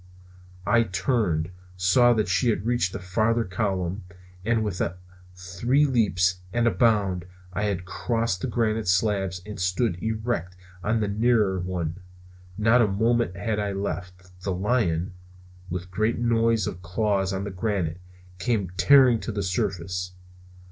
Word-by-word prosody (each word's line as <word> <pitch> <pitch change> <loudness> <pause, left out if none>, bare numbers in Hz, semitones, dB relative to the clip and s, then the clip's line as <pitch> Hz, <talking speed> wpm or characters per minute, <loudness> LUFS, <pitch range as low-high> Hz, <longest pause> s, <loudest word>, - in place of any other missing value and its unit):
I 120 - +4
turned, 95 -4 0 0.3
saw 120 +7 +5
that 110 -2 0
she 110 +6 +2
had 105 -2 -1
reached 120 -6 +1
the - - -4
farther 110 +5 +1
column; 95 -1 -2 0.4
and 115 +1 +1
with 100 -4 -3 0.5
three 95 +11 +1
leaps 95 -8 +2
and 120 +2 +1
a 115 - +4
bound 100 -7 +2 0.3
I 100 +2 -1
had 95 -3 -2
crossed 115 0 -1
the - - -1
granite 110 -3 0
slabs 95 -1 +1
and 105 -1 -7
stood 90 +1 0
erect 110 -5 -2 0.3
on 110 +1 +1
the 105 - 0
nearer 105 -2 +2
one! 90 -1 -3 0.6
Not 110 +3 +4
a 110 - +4
moment 110 0 +1
had 105 +3 -1
I 100 -1 -1
left. 90 -1 -6
The 95 0 -2
lion, 95 -4 0 0.6
with 90 +1 -5
great 110 +5 0
noise 115 -2 +2
of 90 - -5
claws 95 +1 0
on 95 0 -2
the 100 - -4
granite, 90 -4 -2 0.4
came 100 -2 0
tearing 125 +5 +6
to 115 - -4
the 100 -1 -2
surface. 90 0 -2
100 Hz, 150 wpm, -25 LUFS, 90-115 Hz, 0.6 s, tearing